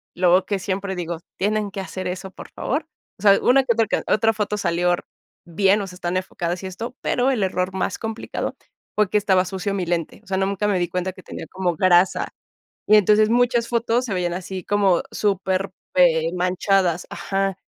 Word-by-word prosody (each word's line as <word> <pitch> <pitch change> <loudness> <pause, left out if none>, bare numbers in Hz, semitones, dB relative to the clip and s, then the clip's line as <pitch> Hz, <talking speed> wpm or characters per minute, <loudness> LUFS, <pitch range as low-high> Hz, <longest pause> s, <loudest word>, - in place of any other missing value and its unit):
luego 180 +1 +4
que 200 -2 -1
siempre 190 0 -3
digo: 170 -2 -4 0.2
"Tienen 205 +1 0
que 195 - -6
hacer 185 -1 -5
eso, 185 +1 -5
por - - -11
favor". 305 +4 -2 0.3
O - - -16
sea, 200 -1 +6
una 270 +2 +5
que 245 -3 +2
otra 225 -1 +1
que - - -1
otra 225 +1 +3
foto 210 -1 -2
salió 175 -2 +1
r 175 - -3 0.4
bien, 195 +4 +2
o 195 - -4
sea, 180 - -10
están 180 0 -2
enfocadas 175 -1 -3
y - - -3
esto, 225 +7 -6
pero 255 +2 +1
el 235 -6 0
error 185 0 -1
más 190 - -2
complicado 225 0 -4 0.4
fue 210 -3 +2
que 210 - +2
estaba 190 -3 +3
sucio 190 +2 -3
mi 185 -3 -1
lente. 170 -2 -2
O - - -26
sea, 190 - -1
nunca 195 +1 0
me 200 -3 +1
di 175 -1 -1
cuenta 180 +1 -2
que 185 -1 -14
tenía - - -8
como 185 -2 -1
grasa. 185 +1 +4 0.6
Y 215 - +7
entonces 210 +2 +4
muchas 240 -1 +2
fotos 235 +1 +1
se 215 - -3
veían 175 -2 -1
así 185 +1 -5
como 200 -4 +3
súper, 195 -1 0 0.2
eh, 165 -2 +4
manchadas. 180 -1 +1
Ajá. 195 -1 -2
190 Hz, 205 wpm, -22 LUFS, 180-210 Hz, 0.6 s, Y